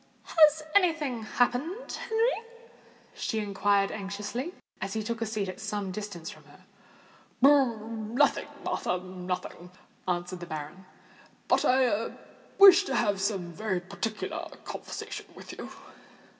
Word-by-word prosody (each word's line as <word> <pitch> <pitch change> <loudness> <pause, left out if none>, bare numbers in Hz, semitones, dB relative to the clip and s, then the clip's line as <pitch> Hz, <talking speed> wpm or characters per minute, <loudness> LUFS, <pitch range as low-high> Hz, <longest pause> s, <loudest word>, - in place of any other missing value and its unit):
"Has 310 -1 +5
any 365 -4 +5
thing 275 -7 -3
happened, 250 - 0
Henry?" 455 +1 0 0.7
she 220 - -2
inquired 200 -1 +2
anxiously, 210 - -4 0.3
as 195 0 -3
he 220 - -2
took 230 +1 -3
a 225 - 0
seat 210 -2 -2
at 185 - -6
some 205 -2 -3
distance 185 -4 -6
from - - -15
her. - - -19 0.7
"Nothing, 235 -2 +3 0.2
Martha—nothing," 180 -1 -3 0.4
answered 180 0 -2
the 175 - -7
baronet. 155 +3 -7 0.6
"But - - +3
I 245 -4 +2 0.4
wish 395 -1 +10
to - - -1
have 205 -4 +1
some 195 -4 -1
very 190 +1 -1
particular 215 +4 -4 0.2
conversation - - -6
with - - -10
you." - - -7
215 Hz, 125 wpm, -29 LUFS, 190-260 Hz, 0.7 s, wish